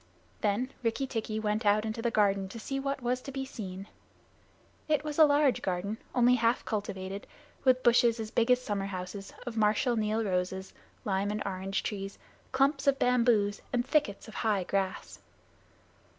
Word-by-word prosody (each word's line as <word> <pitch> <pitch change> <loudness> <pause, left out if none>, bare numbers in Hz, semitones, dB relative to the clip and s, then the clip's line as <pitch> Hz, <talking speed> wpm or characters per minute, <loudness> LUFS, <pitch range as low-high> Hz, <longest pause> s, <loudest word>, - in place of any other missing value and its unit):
Then 230 +6 0
Rikki 235 +3 0
tikki 225 -4 -3
went 215 +1 -1
out 210 +1 +3
into 220 +1 -3
the 235 - +1
garden 200 -3 +2
to 230 - -8
see 270 +5 -3
what 275 -1 -3
was 250 +1 0
to 275 - -7
be 270 0 -3
seen. 195 -7 -7 1.0
It 300 -2 +2
was 300 0 -4
a 315 - +10
large 285 -2 +3
garden, 195 +4 -2 0.2
only 245 0 +5
half 235 0 +2
cultivated, 195 -2 -4 0.4
with 255 -1 +4
bushes, 235 -1 +4
as 220 -1 -5
big 230 +1 +1
as 250 0 +5
summer 205 -5 -2
houses, 190 +1 -6
of 240 -2 -5
Marshal 220 +3 +2
Niel 215 0 0
roses, 190 -1 -2 0.3
lime 195 0 0
and 210 +1 -2
orange 195 0 -2
trees, 195 -1 -4 0.3
clumps 275 +1 +2
of 275 -1 +4
bamboos, 235 -5 +2
and 245 -1 0
thickets 265 -9 0
of 220 - -10
high 210 -4 0
grass. 190 +1 -2
220 Hz, 170 wpm, -30 LUFS, 200-250 Hz, 1.0 s, a